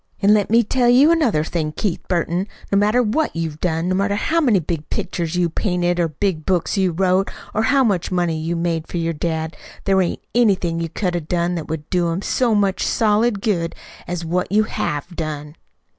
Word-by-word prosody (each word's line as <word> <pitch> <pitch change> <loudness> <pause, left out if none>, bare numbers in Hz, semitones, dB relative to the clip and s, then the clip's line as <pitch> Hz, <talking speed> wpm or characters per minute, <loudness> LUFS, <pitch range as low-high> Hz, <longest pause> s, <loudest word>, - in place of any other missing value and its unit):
An' 205 0 +5
let 210 -2 +2
me 230 +2 +5
tell 245 +2 +2
you 270 +6 +6
another 260 - +2
thing, 155 -1 -2
Keith 185 +1 -2
Burton. 175 +2 0 0.2
No 200 - +3
matter 215 +5 +3
what 240 - 0
you 165 -1 -2
done 165 0 -1
no 185 - +1
matter 200 +2 +1
how 325 +10 +1
many 245 -9 +4
big 155 -2 -4
pictures 170 -1 -3
you 175 -1 +2
painted, 175 0 -1
or 170 - +2
big 160 +1 -2
books 180 +1 0
you 190 -2 +2
wrote, 185 +2 +1 0.2
or 215 - +1
how 265 +5 +3
much 195 -8 0
money 175 -3 +1
you 165 +2 -2
made 165 -1 -1
for - - -5
your 165 0 -1
dad; 160 0 -3 0.3
there 195 -1 +3
ain't 175 - -2
anything 190 -8 +2
you 165 -1 -2
could've 175 -3 -2
done 175 0 0
that 165 -3 -4
would 155 -2 -5
do 180 -2 +2
him 170 +4 -2
so 240 -4 +1
much 200 -2 +1
solid 215 -1 +2
good 170 -7 0 0.3
as 175 -1 -4
what 180 +3 -1
you 215 +2 +4
have 175 -4 -3
done." 150 -2 -5
180 Hz, 205 wpm, -20 LUFS, 165-210 Hz, 0.3 s, you